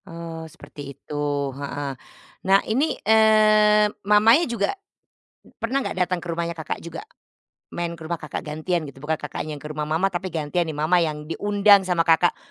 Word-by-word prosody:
Eee, 165 -1 -8
seperti 150 - -13 0.2
itu, - - -12 0.4
heeh. 140 0 -5 0.5
Nah 195 +1 +6
ini, 265 +8 0
eee, 215 -1 +5 0.2
mamanya 215 +9 +5
juga 235 - -1 0.9
pernah 245 +4 0
nggak 275 - -3
datang 180 0 -2
ke 175 - -11
rumahnya 170 0 -3
Kakak 160 - -5
juga, 170 - -8 0.7
main 170 -1 -4
ke 165 - -13
rumah 170 0 -4
Kakak 155 - -6
gantian 155 +3 -2
gitu? 140 -2 -11
Bukan 155 +3 -1
Kakaknya 150 +1 -6
yang 145 - -13
ke - - -5
rumah 150 0 -4
mama, 175 +5 +1
tapi 180 +1 -3
gantian 165 +1 -2
nih 155 - -5
mama 160 +4 +2
yang 150 -2 -2
diundang 205 +5 +4
sama 170 -2 +2
Kakak, 165 +1 +3
170 Hz, 175 wpm, -23 LUFS, 155-205 Hz, 0.9 s, Nah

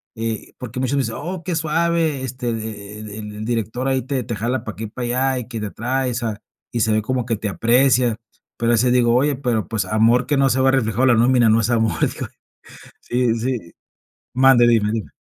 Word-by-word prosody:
eh, 115 -1 -4
porque 125 -1 -6
muchas 130 +2 0
veces, 115 -5 -1
oh, 175 +2 -5
que 175 0 -2
suave, 160 -2 0
este, 125 -1 -4
e 105 -2 -6
e 105 -1 -8
e - - -7
el 105 0 -7
director 120 +2 -2
ahí 130 -1 0
te 135 0 -2
te 120 - -4
jala 120 +3 -2
para 110 - -6
aquí 110 - -7
y - - -3
para 120 +3 -5 0.3
allá, 130 - -1
y 120 - -7
que 120 -2 -5
te 105 -2 -4
trae, 130 +3 -1
o - - -3
sea, 115 -3 -3 0.3
y 120 - -1
se 110 - +2
ve 110 - +2
como 125 +2 -2
que 115 -1 0
te 105 0 -4
aprecia. 120 +2 +3 0.4
Pero 115 0 +1
a - - +5
veces 125 +2 +2
digo: 120 -1 +3
"Oye, 140 +3 +2
pero, 120 -5 -1
pues, 110 -4 -2
amor 115 +5 +3
que 145 - +1
no 135 0 +3
se 130 +1 +1
vea 135 - +4
reflejado 120 -2 +1
en - - +4
la 120 - +5
nómina, 120 0 +4
no 110 +1 +4
es 110 - -1
amor", 110 -7 +1
digo. - - -5 0.7
Sí, 120 -1 0
sí 115 -8 -3 0.6
mande, 130 -2 +5
dime, 110 -3 +3
dime. 110 -2 -4
120 Hz, 235 wpm, -20 LUFS, 110-130 Hz, 0.7 s, a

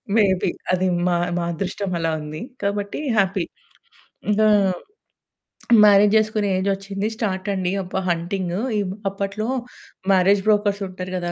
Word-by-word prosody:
May 225 - +6 0.2
be. - - +1 0.2
అది 185 0 +2 0.2
మా 175 - +2 0.2
మా 175 - -1
అదృష్టం 190 +3 -3
అలా 165 0 0
ఉంది. 150 +1 -7 0.2
కాబట్టి 200 0 -2 0.2
హ్యాపీ. 195 -2 +2 0.8
ఇంకా 215 +1 +4 1.4
మ్యారేజ్ 205 0 +6
జేసుకునే 215 -1 +1
ఏజొచ్చింది. 195 +1 -2
స్టార్టండి. 190 -3 -1
అబ్బా! 185 +1 -3
హంటింగు 175 +2 -2 0.2
ఇబ్ 185 -1 -3 0.2
అప్పట్లో 200 +2 -3 0.6
మ్యారేజ్ 195 +1 +4
బ్రోకర్స్ 205 -1 +2
ఉంటారు 185 0 -7
గదా! 175 -1 -3
195 Hz, 120 wpm, -22 LUFS, 185-205 Hz, 1.4 s, May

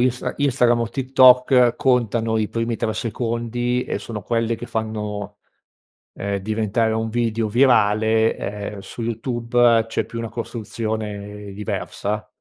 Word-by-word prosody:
Insta 125 0 0
Instagram 125 -4 +2
o 115 - -1
TikTok 125 -1 +5
contano 115 -3 +1
i 105 -1 0
primi 115 0 -2
3 110 - -1
secondi 120 +2 -2
e - - -3
sono 110 -3 -6
quelle 115 +1 0
che 120 - -8
fanno, 105 -3 -4 0.8
ehm, 100 0 -3
diventare 110 +2 0
un 110 0 -1
video 115 -1 0
virale, 110 -2 +3
ehm, 105 0 -5
su 100 +4 -7
YouTube 115 0 +2
c'è - - -1
più 115 - -8
una 115 -1 -4
costruzione 105 -2 -5
diversa, 105 +1 -4
115 Hz, 130 wpm, -22 LUFS, 105-120 Hz, 0.8 s, TikTok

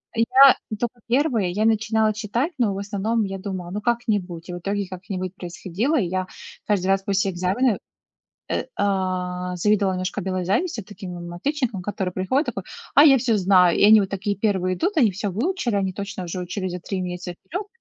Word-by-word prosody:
Я 255 +4 +7 0.2
тока 240 0 -3
1, 240 - +1
я 210 +4 0
начинала 220 0 +2
читать, 230 - -1
но, 225 -6 +2
в 195 - -5
основном, 205 +3 -1
я 195 -1 -4
думала: 185 -3 -5
"Ну, 210 +2 -3
как-нибудь". 205 -7 -1
И - - -4
в 175 - -5
итоге 200 +1 -2
как-нибудь 185 0 -5
происходило. 190 - -2
И 195 - +1
я 185 +1 -2 0.4
каждый 195 -3 +1
раз 195 0 +2
после 195 -1 +1
экзамена, 190 +6 +1 0.7
э, - - -1
а, 180 -2 -1
завидовала 200 0 +2
немножко 185 0 -3
белой 185 0 -2
завистью 220 - -1
таким 190 -3 -8
мам 175 0 -7
отличникам, 250 -2 -2
которые 190 -2 -3
приходят, 260 - 0
такой: - - -3 0.3
"А 290 - +8
я 270 -4 +7
всё 230 -2 +1
знаю!" 180 -3 +4
И - - +5
они 215 +1 +8
вот 195 - -1
такие 200 +1 -2
1 190 -3 0
идут, 370 - -1
они 235 -8 +5
всё 200 +2 -3
выучили, 245 - -1
они 190 -1 0
точно 195 -1 -5
уже 180 +2 -4
учили 185 +1 -3
за 180 0 -5
3 190 +2 -4
месяца 180 0 -4
вперёд. 375 +6 -5
200 Hz, 190 wpm, -23 LUFS, 185-225 Hz, 0.7 s, А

